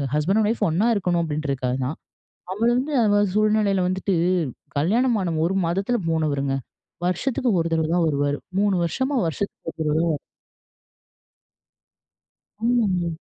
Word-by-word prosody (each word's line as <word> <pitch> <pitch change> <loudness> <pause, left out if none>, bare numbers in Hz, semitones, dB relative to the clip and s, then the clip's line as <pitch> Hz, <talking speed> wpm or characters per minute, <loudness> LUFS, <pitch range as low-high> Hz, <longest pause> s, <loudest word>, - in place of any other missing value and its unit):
ஹஸ்பண்ட்டும் 195 +9 +2
wife 225 -1 -1
ஒண்ணா 180 +8 +1
இருக்கணும் 180 -4 +1
அப்டின்றதுக்காக 140 -5 -2
தான். 145 +6 -4 0.6
அவளு 225 +4 +1
வந்து 280 +4 -2
அவ 205 0 +3
சூழ்நிலையில 210 -3 +2
வந்துட்டு, 190 +1 -1 0.6
கல்யாணம் 225 - +2
ஆன 170 -2 -1
1 185 +3 0
மாதத்தில 195 +8 0
போனவருங்க. 145 -4 0 0.5
வருஷத்துக்கு 245 +7 0
1 165 - -1
தடவ 160 -1 +1
தான் 175 -2 +3
வருவாரு. 145 -1 0 0.2
3 200 -1 +2
வருஷமா 260 - -1
வருஷத்துக்கு 165 +1 -4
1 - - -38
தடவ 155 -1 0
தான் - - +1 0.2
வருவாரு. - - -7 2.5
ஆமாங்க. 200 -8 +1
185 Hz, 130 wpm, -23 LUFS, 155-215 Hz, 2.5 s, அவ